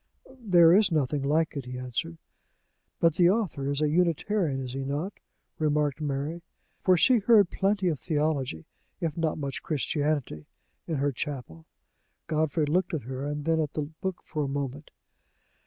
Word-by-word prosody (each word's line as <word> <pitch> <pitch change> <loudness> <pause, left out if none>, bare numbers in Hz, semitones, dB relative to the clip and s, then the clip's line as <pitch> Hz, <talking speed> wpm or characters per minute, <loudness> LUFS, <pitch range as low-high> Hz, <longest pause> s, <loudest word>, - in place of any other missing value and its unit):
"There 175 -7 +6
is 205 -2 +4
nothing 145 -2 +1
like 155 +4 +1
it," 135 -3 -5
he 125 0 -6
answered. 125 -10 -4 0.8
"But 165 -1 +4
the 175 -1 +6
author 180 -10 0
is 145 +1 0
a - - +3
Unitarian, 170 -1 +1
is 130 -2 -5
he 135 0 -3
not?" 145 +9 -3 0.5
remarked 150 -1 +1
Mary 145 +3 -2 0.4
for 185 -1 +4
she 245 +7 +5
heard 210 -3 +5
plenty 195 -1 +1
of 155 -6 0
theology, 145 - -1 0.3
if 160 -3 -2
not 165 -2 -1
much 140 -3 -4
Christianity, 145 - -2 0.4
in 165 - -1
her 145 0 +1
chapel. 125 - -6 0.6
Godfrey 155 -1 0
looked 170 +3 0
at 150 - -4
her, 135 +4 -4
then 160 +2 0
at 150 -3 -1
the 150 0 -3
book 190 -2 -3
for 150 -2 -3
a - - -3
moment. 140 +1 -4
150 Hz, 160 wpm, -27 LUFS, 140-170 Hz, 0.8 s, There